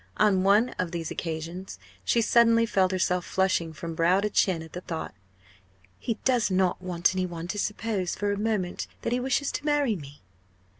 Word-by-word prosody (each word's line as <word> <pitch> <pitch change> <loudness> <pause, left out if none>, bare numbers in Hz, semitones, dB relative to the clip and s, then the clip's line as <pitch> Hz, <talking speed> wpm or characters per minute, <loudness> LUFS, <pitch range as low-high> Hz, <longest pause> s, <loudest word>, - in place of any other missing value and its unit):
On 200 -3 +4
one 205 +6 +4
of 180 -2 0
these 165 -1 -4
occasions 165 - -5 0.3
she 230 - +2
suddenly 230 0 +4
felt 190 -4 +2
herself 180 -1 +1
flushing 185 -4 0
from 165 +1 -6
brow 170 +4 +3
to 210 +1 -1
chin 180 -5 +2
at 160 - -13
the 180 - -5
thought 165 -3 -5 0.9
"He 230 - -2
does 250 -5 +3
not 185 -1 +1
want 180 -1 +1
any 185 -1 -1
one 170 -1 -6
to 205 - -3
suppose 210 -3 -2
for 205 0 -1
a - - 0
moment 210 -5 -1 0.2
that - - 0
he 245 - +1
wishes 265 +2 0
to - - -4
marry 290 -6 +2
me!" 145 - -11
185 Hz, 190 wpm, -27 LUFS, 175-220 Hz, 0.9 s, On